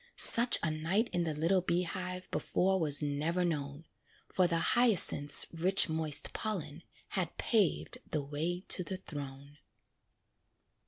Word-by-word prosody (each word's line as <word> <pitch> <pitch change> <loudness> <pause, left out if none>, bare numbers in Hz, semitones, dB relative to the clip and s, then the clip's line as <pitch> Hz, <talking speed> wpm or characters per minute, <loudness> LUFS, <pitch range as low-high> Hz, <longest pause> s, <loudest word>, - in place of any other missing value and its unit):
Such 240 +1 +7
a 155 - -1
night 175 +9 -2
in 175 -1 -2
the 155 -2 -4
little 170 +5 0
bee 175 0 -2
hive 180 +1 -6
Before 190 +1 -2
was 150 -3 -1
never 155 +5 -2
known; 145 -2 -5 0.5
For 185 -1 +1
the 170 -1 -1 0.2
hyacinth's 200 -11 +5
rich 180 +3 +2
moist 160 -2 -4
pollen 170 -8 -5 0.3
Had 180 -4 -3
paved 215 -6 -1
the 150 -2 -4
way 160 +5 -5
to 180 - 0
the 190 +1 -7
throne. 145 -4 -11
170 Hz, 140 wpm, -30 LUFS, 150-185 Hz, 0.5 s, Such